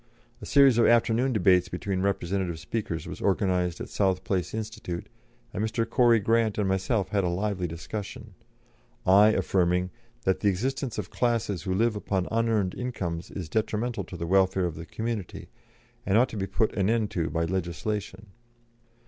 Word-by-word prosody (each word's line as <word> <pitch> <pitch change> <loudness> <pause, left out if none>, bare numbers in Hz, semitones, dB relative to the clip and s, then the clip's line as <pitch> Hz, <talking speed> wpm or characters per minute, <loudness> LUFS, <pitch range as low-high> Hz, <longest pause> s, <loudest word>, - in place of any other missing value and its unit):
A - - -7
series 135 -4 +5
of 115 - +5
afternoon 120 +2 +3
debates 90 -5 +3
between 95 +1 -2
representative 95 -2 -1
speakers 85 0 -4
was - - -8
organised 90 -3 +1
at - - -5
South 95 -2 0
Place 95 -3 -1
Institute, 110 -5 -5 0.5
and 105 - -2
Mr. 110 +1 -1
Corrie 120 -1 +4
Grant 115 0 +1
and 105 -2 +1
myself 95 +1 0
had 100 -1 +1
a - - +1
lively 95 0 -1
discussion, 85 +5 -7 0.7
I 100 +3 +7
affirming 90 -3 +1 0.3
"That 95 - +1
the 105 - +2
existence 125 +5 -2
of - - -5
classes 115 -6 0
who 95 -2 -2
live 115 +2 +2
upon 95 -3 -2
unearned 110 -4 +1
incomes 95 -9 -4
is 90 -5 -6
detrimental 110 +5 -1
to 90 - -9
the 85 - -4
welfare 95 +1 +3
of 85 - -2
the 80 +1 -9
community, 110 0 -5 0.5
and 100 - +2
ought 125 +3 +4
to - - -8
be 95 -1 -2
put 105 +3 0
an 95 0 +1
end 110 -2 +1
to 85 -3 -1
by 85 0 0
legislation." 95 +3 -4
100 Hz, 170 wpm, -27 LUFS, 90-110 Hz, 0.7 s, I